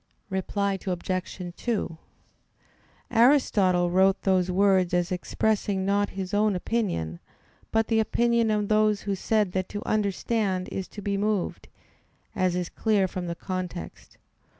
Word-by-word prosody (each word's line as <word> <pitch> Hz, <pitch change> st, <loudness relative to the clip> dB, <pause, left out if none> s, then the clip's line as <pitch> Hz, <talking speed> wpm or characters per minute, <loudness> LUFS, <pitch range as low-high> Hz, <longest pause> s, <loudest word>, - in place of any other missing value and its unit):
Reply 195 Hz, +1 st, -1 dB
Obj. 180 Hz, -1 st, -3 dB
2: 215 Hz, -8 st, -2 dB, 1.1 s
Aristotle 205 Hz, -8 st, +4 dB
wrote 190 Hz, +1 st, +4 dB
those 185 Hz, -2 st, +2 dB
words 185 Hz, -1 st, +3 dB
as 175 Hz, 0 st, 0 dB
expressing 195 Hz, +1 st, 0 dB
not 200 Hz, +1 st, +1 dB
his 190 Hz, -1 st, -4 dB
own 210 Hz, -1 st, +2 dB
opinion, 180 Hz, -, -2 dB, 0.5 s
but 225 Hz, 0 st, +2 dB
the 225 Hz, 0 st, +1 dB
opinion 235 Hz, +1 st, +2 dB
of 210 Hz, -1 st, +1 dB
those 215 Hz, -1 st, +3 dB
who 200 Hz, -, -2 dB
said 210 Hz, 0 st, +1 dB
that 185 Hz, 0 st, -2 dB
to 205 Hz, -, -6 dB
understand 200 Hz, -2 st, 0 dB
is 190 Hz, -, -4 dB
to 205 Hz, -, -10 dB
be 200 Hz, 0 st, -1 dB
moved, 205 Hz, -2 st, -1 dB, 0.7 s
as 185 Hz, -3 st, +1 dB
is 180 Hz, -1 st, -1 dB
clear 205 Hz, -1 st, +1 dB
from 180 Hz, -1 st, -5 dB
the 170 Hz, -, -3 dB
context. 185 Hz, -1 st, -6 dB
195 Hz, 135 wpm, -26 LUFS, 185-215 Hz, 1.1 s, Aristotle